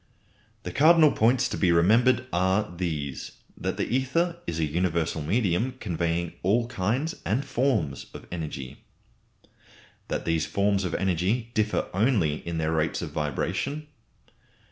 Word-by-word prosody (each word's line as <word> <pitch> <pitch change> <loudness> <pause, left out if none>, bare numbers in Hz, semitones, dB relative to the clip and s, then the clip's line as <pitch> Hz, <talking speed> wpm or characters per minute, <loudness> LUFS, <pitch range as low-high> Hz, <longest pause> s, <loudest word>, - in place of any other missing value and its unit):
The 90 - -5
cardinal 155 - +6
points 125 +3 +3
to - - -3
be 90 -3 +3
remembered 115 +9 +4
are 95 +2 +1
these: 75 -6 -4 0.2
That - - -3
the - - 0
ether 165 +7 0
is 80 -1 -2
a 80 - +2
universal 85 0 -1
medium, 105 - +1
conveying 85 -3 -1
all 115 +6 +2
kinds 120 - -1
and 125 +8 0
forms 120 - 0
of - - -10
energy. 75 -7 -6 1.2
That - - -3
these 80 -1 0
forms 100 -1 +1
of 85 - -2
energy 95 +6 0
differ 105 -1 0
only 95 - +2
in 85 -1 -2
their 80 0 0
rates 80 0 0
of - - -5
vibration. 135 - -2
95 Hz, 140 wpm, -26 LUFS, 85-120 Hz, 1.2 s, cardinal